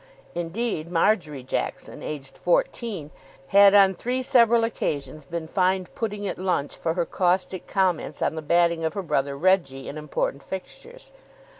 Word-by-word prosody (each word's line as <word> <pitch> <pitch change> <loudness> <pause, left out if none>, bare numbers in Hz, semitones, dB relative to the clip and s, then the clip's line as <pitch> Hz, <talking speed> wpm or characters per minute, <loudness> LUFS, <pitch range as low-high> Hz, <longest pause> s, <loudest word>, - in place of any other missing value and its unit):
Indeed, 175 -1 -3
Marjory 165 -6 +1
Jackson, 130 - -4
aged 140 -3 -6
fourteen, 235 - -1 0.4
had 200 0 +7
on 195 -1 +7
three 250 +7 -2
several 235 -2 +5
occasions 155 -9 -3
been 165 +2 -5
fined 185 0 0
pudding 210 -3 -3
at - - -4
lunch 180 -6 -1
for 165 -1 -2
her 175 -2 0
caustic 185 +1 0
comments 190 -4 0
on - - 0
the 160 - -5
batting 170 +1 +2
of 160 +4 -1
her 200 - -2
brother 140 -3 -1
Reggie 165 -6 +1
in 155 - -6
important 140 -2 -2
fixtures. 480 - -9
180 Hz, 150 wpm, -25 LUFS, 155-205 Hz, 0.4 s, had